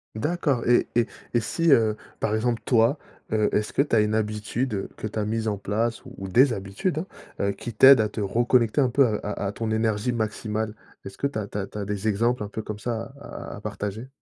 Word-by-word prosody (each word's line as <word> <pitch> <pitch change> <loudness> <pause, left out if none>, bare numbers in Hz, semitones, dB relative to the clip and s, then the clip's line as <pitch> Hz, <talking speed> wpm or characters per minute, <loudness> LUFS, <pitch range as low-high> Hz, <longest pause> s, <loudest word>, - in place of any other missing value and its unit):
D'accord 145 -1 0
et 120 - +4
et 120 0 +3 0.3
et 120 - +4
si, 165 +8 +1
heu, 110 -4 +4 0.2
par 105 - 0
exemple, 115 +1 0
toi, 120 +4 +3 0.3
heu, 110 -1 +2
est-ce 105 - 0
que - - +3
tu 140 -5 +1
as - - +5
une 105 0 +1
habitude 110 +1 -1
que - - -4
tu 110 - -7
as 105 - 0
mise 110 +1 -1
en 105 -2 0
place 110 +4 -1
ou 95 - -8
des 125 +6 +5
habitudes, 100 - -2 0.4
hein, - - +1
heu, - - +2
qui 115 +4 -7
t'aident 135 +3 +8
à 105 -1 +2
te 110 - -5
reconnecter 120 +4 +2
un 130 -3 +4
peu 135 +1 +5
à 110 - 0
à 105 - -3
à - - -2
ton 110 +1 -3
énergie 110 +2 +1
maximale? 110 -1 -2 0.3
Est-ce 95 0 -9
que - - -2
tu 140 -6 -1
as 100 - -4
tu 100 - -6
as 95 - -1
tu 105 - -8
as 100 - -3
des 105 +1 -3
exemples 115 +2 +1
un - - -4
peu 110 +2 -5
comme 105 0 -6
ça 115 +2 -3
à 145 - -8
à - - -7
à - - -10
partager? 105 +4 -5
110 Hz, 245 wpm, -25 LUFS, 105-120 Hz, 0.4 s, t'aident